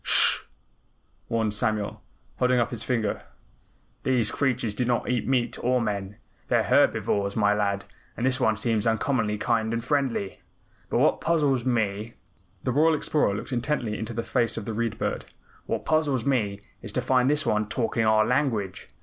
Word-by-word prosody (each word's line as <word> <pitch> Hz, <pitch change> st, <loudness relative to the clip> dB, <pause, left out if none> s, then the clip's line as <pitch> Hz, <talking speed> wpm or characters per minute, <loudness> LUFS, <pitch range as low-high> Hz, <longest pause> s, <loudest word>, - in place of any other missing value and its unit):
"Sh -, -, +5 dB
hh!" -, -, -22 dB, 0.8 s
warned 110 Hz, -2 st, 0 dB
Samuel, 105 Hz, -1 st, 0 dB, 0.4 s
holding 125 Hz, 0 st, +2 dB
up 120 Hz, -, 0 dB
his 120 Hz, -3 st, -5 dB
finger. 115 Hz, -5 st, -1 dB, 0.8 s
"These 125 Hz, -5 st, +1 dB
creatures 125 Hz, -6 st, 0 dB
do 115 Hz, -, -1 dB
not 120 Hz, -1 st, 0 dB
eat 125 Hz, -1 st, -1 dB
meat 125 Hz, -3 st, 0 dB
or 125 Hz, +1 st, +2 dB
men. 100 Hz, -3 st, -3 dB, 0.3 s
They're -, -, +2 dB
herbivorous, 100 Hz, 0 st, +2 dB
my 105 Hz, -2 st, +3 dB
lad, 100 Hz, -1 st, -1 dB, 0.3 s
and 120 Hz, -, -1 dB
this 130 Hz, -1 st, +1 dB
one 110 Hz, -1 st, +2 dB
seems 110 Hz, 0 st, 0 dB
uncommonly 115 Hz, -2 st, 0 dB
kind 110 Hz, 0 st, 0 dB
and 115 Hz, 0 st, -2 dB
friendly. 130 Hz, -7 st, -1 dB, 0.5 s
But -, -, 0 dB
what -, -, +3 dB
puzzles 145 Hz, -7 st, +1 dB
me 110 Hz, -2 st, -1 dB, 0.2 s
" -, -, -37 dB
the 125 Hz, -, 0 dB
Royal 155 Hz, +5 st, +4 dB
Explorer 150 Hz, -8 st, +1 dB
looked 105 Hz, -, -6 dB
intently 125 Hz, -3 st, -1 dB
into 110 Hz, +1 st, -5 dB
the 115 Hz, -, -2 dB
face 115 Hz, 0 st, 0 dB
of 110 Hz, -, -4 dB
the 115 Hz, -, -4 dB
Read 115 Hz, 0 st, -2 dB
Bird. -, -, -2 dB, 0.4 s
"What -, -, -2 dB
puzzles 145 Hz, -6 st, +1 dB
me 105 Hz, -7 st, 0 dB, 0.2 s
is 115 Hz, -, -6 dB
to 125 Hz, -, 0 dB
find 130 Hz, 0 st, +3 dB
this 150 Hz, 0 st, +1 dB
one 105 Hz, -2 st, 0 dB
talking 115 Hz, 0 st, 0 dB
our 110 Hz, 0 st, +4 dB
language. 110 Hz, -8 st, -1 dB
115 Hz, 175 wpm, -26 LUFS, 105-130 Hz, 0.8 s, Sh